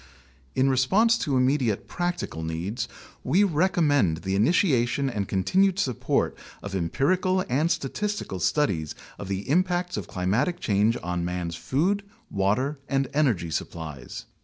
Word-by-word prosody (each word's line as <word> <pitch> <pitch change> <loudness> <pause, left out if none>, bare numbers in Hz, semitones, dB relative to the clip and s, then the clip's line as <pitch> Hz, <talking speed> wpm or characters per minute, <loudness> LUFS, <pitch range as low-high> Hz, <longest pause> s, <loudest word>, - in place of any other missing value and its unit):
In 130 - +3
response 190 - +4
to 140 -5 0
immediate 130 -4 +1
practical 175 - -3
needs, 80 +8 -3 0.4
we 180 +10 +3
recommend 150 - +2
the 95 0 -1
initia 125 - +3
tion 135 +2 -1
and 100 -4 -2
continued 185 - +2
support 130 - 0 0.3
of 100 - -6
empirical 180 - +1
and 145 +7 +1
statistical 160 - -2
studies 85 - 0 0.2
of 100 - -6
the 95 +1 -3
impacts 180 +2 +1
of - - -4
climatic 105 - 0
change 110 - +2
on 90 0 -2
man's 90 -1 -3
food, 155 - 0 0.3
water, 125 +9 0
and 135 -2 +1
energy 120 - +1
supplies. 75 -5 -5
130 Hz, 135 wpm, -26 LUFS, -, 0.4 s, response